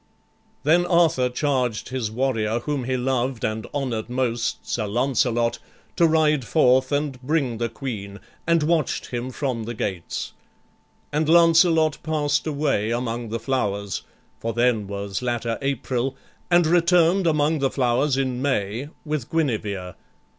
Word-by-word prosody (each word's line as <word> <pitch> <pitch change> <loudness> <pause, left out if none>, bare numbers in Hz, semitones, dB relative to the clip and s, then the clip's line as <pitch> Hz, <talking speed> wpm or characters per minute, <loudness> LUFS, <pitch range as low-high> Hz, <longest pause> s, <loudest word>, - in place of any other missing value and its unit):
Then 175 +4 +3
Arthur 165 -7 +3
charged 125 -4 -1
his 130 -4 -2
warrior 115 -2 0
whom 140 -2 -2
he 130 0 0
loved 125 -1 -1
And 110 -1 -3
honored 125 -6 -3
most, 125 -1 -1
Sir 110 -3 -1
Lancelot, 120 0 +1 0.4
to 170 - +4
ride 155 -3 +3
forth 130 0 +3
And 145 -3 -1
bring 130 -4 0
the 115 0 -1
Queen; 105 -5 -6 0.3
and 170 -2 +3
watch'd 160 -2 0
him 120 +1 -3
from 125 -4 -3
the 120 +1 -5
gates; 95 -5 -4 0.8
And 155 +1 +1
Lancelot 165 -2 +5
past 155 -1 0
away 140 -8 0
among 120 -1 -2
the 115 +1 -3
flowers, 100 -5 -2 0.4
(For 115 0 -3
then 120 -3 +1
was 100 +1 -4
latter 120 -2 -2
April) 135 -1 -1 0.3
and 175 -1 +5
return'd 175 +2 +4
Among 155 0 +2
the 135 -1 +2
flowers, 130 +2 +1
in 130 -2 -1
May, 125 -1 -1 0.2
with 150 -5 -3
Guinevere. 105 - -1
130 Hz, 140 wpm, -23 LUFS, 115-150 Hz, 0.8 s, Lancelot